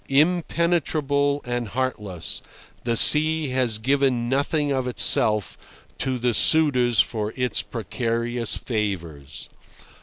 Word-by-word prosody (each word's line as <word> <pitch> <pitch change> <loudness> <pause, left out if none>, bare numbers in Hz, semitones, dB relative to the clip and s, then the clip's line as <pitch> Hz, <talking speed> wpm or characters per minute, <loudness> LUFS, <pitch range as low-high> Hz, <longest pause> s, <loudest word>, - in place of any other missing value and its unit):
Impenetrable 150 -2 0
and 120 -1 -4
heartless, 105 -8 -4 0.4
the 120 -1 0
sea 155 +2 +6
has 125 -4 0
given 130 0 0
nothing 145 +3 -1
of 130 -2 -2
itself 105 -5 +1 0.4
to 130 -1 -2
the 125 0 -1
suitors 125 -4 +3
for 110 -2 0
its 125 -1 -1
precarious 115 +1 -3
favours. 85 - -5
125 Hz, 100 wpm, -22 LUFS, 115-140 Hz, 0.4 s, sea